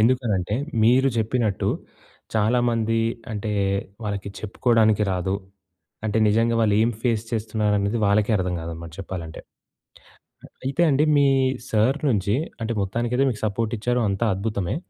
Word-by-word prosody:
ఎందుకనంటే 110 -5 +1 0.3
మీరు 125 +4 +5
జెప్పినట్టు 110 -2 0 0.7
చాలామంది 115 0 +2 0.3
అంటే 105 0 -3 0.5
వాళ్ళకి 100 -2 -3
చెప్పుకోడానికి 110 -1 +2
రాదు. 95 +1 -1 0.7
అంటే 110 0 0
నిజంగా 115 +2 +2
వాళ్ళు 105 -2 +3
ఏం 115 +2 +2
ఫేస్ 115 -3 0
చేస్తున్నారనేది 105 -1 0
వాళ్ళకే 100 +2 +2
అర్థం 90 -1 -1
గాదన్నమాట 80 0 -7
చెప్పాలంటే. 85 -4 -6 1.0
అ - - -10 0.2
అయితే 135 +5 0
అండి 140 +1 +3
మీ 140 -1 +5 0.4
సార్ 115 +6 +2
నుంచి 100 -1 +1 0.3
అంటే, 115 +1 -1
మొత్తానికైతే 120 +6 0
మీకు 110 -4 -5
సపోర్ట్ 110 +2 -1
ఇచ్చారు. 125 +3 0
అంతా 100 +4 0
అద్భుతమే. 100 -1 -2
110 Hz, 125 wpm, -23 LUFS, 100-120 Hz, 1.0 s, మీరు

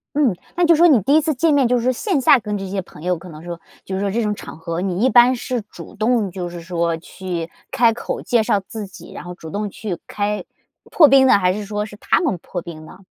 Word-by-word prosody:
嗯， 265 -11 +2 0.2
那 350 - +4
就 335 - +6
是 315 - -2
说 345 - +7
你 260 -7 +6
第 280 +10 +3
1 315 - +5
次 310 0 0
见 310 +3 +2
面， 275 -3 +4
就 250 - +3
是 235 - -2
说 255 - +3
线 335 - -1
下 260 - +6
跟 210 -2 -3
这 195 -1 -5
些 195 0 -2
朋 155 -4 -15
友， 180 -1 0
可 180 +2 -12
能 155 0 -11
说， 170 -1 -6 0.3
就 190 - -4
是 195 - -2
说 200 -1 -1
这 235 +3 0
种 210 -1 -1
场 160 - -10
合， 165 +1 -4
你 190 +4 0
一 - - +4
般 245 +1 +6
是 245 -1 -3
主 - - -11
动 220 -2 +1
就 180 -1 -5
是 175 0 -8
说 170 -1 -1
去 175 -1 -6 0.2
开 230 -2 +4
口 - - -5
介 235 -3 +2
绍 205 -1 +2
自 220 -2 -6
己， 190 - -13
然 - - -8
后 180 0 -7
主 160 -2 -10
动 205 +2 -3
去 195 -3 -5
开 210 0 -2 0.5
破 310 - +7
冰 270 -1 +6
呢， 205 - +6
还 180 -1 +2
是 210 - -4
说 210 +1 -3
是 210 - -11
他 205 - +1
们 275 - 0
破 175 - -5
冰 155 -2 -10
呢？ 185 - -14
205 Hz, 290 characters per minute, -20 LUFS, 180-245 Hz, 0.5 s, 说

